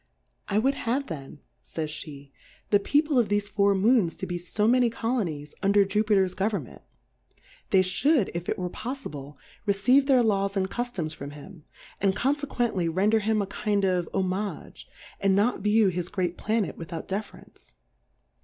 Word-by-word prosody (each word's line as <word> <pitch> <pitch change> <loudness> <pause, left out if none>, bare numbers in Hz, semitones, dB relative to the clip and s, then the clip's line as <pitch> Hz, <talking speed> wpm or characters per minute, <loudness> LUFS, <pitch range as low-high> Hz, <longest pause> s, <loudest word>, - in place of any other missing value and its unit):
I 200 - 0
would 265 +6 +3 0.2
have 275 +4 +1
then, 145 - -8 0.2
firjs 155 -1 -4
/7;^, 140 -1 -12 0.4
the 205 - +6
People 290 +5 +2
of 235 - +2
thefe 205 0 0
Four 200 -1 +3
Moons 205 -3 +3
to - - -5
be 175 -1 -4
fo 210 +5 -1
many 245 0 +4
Colonies 195 - -3
under 200 0 +4
Juyitev^s 195 -2 +2
Government; 195 - -2 0.9
they 190 -1 +5
fhould, 235 - +2
if 170 0 -4
It - - -1
were 180 - -2
poifible, 150 - -6 0.3
receive 250 +8 +4
their 260 -3 +5
Laws 200 -2 +1
and 190 0 0
Cultoms 210 -11 -3
from 140 -2 -7
him; 155 +2 -13 0.4
and 195 -1 +2
confe 280 +6 0
quently 210 -11 0
render 205 +6 +3
him 215 0 +1
a - - -3
kind 200 0 -1
of 180 -3 0
Homage, 195 +2 -3 0.3
and 195 -1 +3
not 210 +5 +2
view 210 0 +3
his 180 0 -3
great 180 -2 -2
Planet 215 +1 -1
without 165 0 -6
Deference. 205 +2 -7
200 Hz, 165 wpm, -26 LUFS, 180-225 Hz, 0.9 s, the